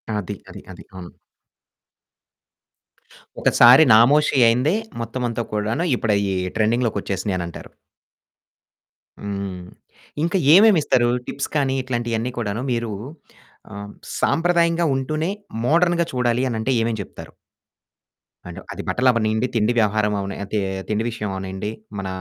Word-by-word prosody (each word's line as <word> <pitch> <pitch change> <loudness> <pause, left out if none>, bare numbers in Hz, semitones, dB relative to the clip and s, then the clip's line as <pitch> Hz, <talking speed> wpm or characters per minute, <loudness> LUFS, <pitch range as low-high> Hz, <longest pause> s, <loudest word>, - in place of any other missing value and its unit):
అది, 105 -4 -4
అది, - - -10
అది. 95 - -12
అవును. 90 -2 -10 2.2
ఒకసారి 125 +5 +7
నామోషి 140 +6 +4
అయిందే 125 - +2 0.3
మొత్తమంతా 120 0 -3
కూడాను 110 +9 -1
ఇప్పుడయి 100 -4 0 0.2
ట్రెండింగ్‌లోకొచ్చేసినియనంటారు. 105 -6 -2 1.5
హ్మ్. 100 -2 -5 0.6
ఇంకా 175 +3 +1 0.2
ఏమేమిస్తారు? 170 - +5 0.2
టిప్స్ 140 - -4
కానీ 135 -2 +1
ఇట్లాంటియన్నీ 120 -1 -2
కూడాను 110 0 -3
మీరు 115 -2 -2 0.8
ఆహ్, 100 0 -7 0.3
సాంప్రదాయంగా 170 0 +2
ఉంటూనే 155 +6 -2 0.4
మోడర్న్‌గా 170 +3 +2
చూడాలి 125 0 0
అనంటే 115 +3 -2
ఏమేం 115 0 -1
చెప్తారు? - - -11 1.2
అండు - - -9
అది - - -6
బట్టలు 125 +1 +2
అవనీండి, 110 0 0
తిడి 115 +2 +2
వ్యవహారం 105 0 +1
అవ 100 - -3 0.3
తి 105 - +1 0.3
తిండి 110 +1 0
విషయం 110 -3 -5
అవనీండి. 95 +2 -5 0.3
మన 95 - -4
115 Hz, 105 wpm, -21 LUFS, 105-135 Hz, 2.2 s, ఒకసారి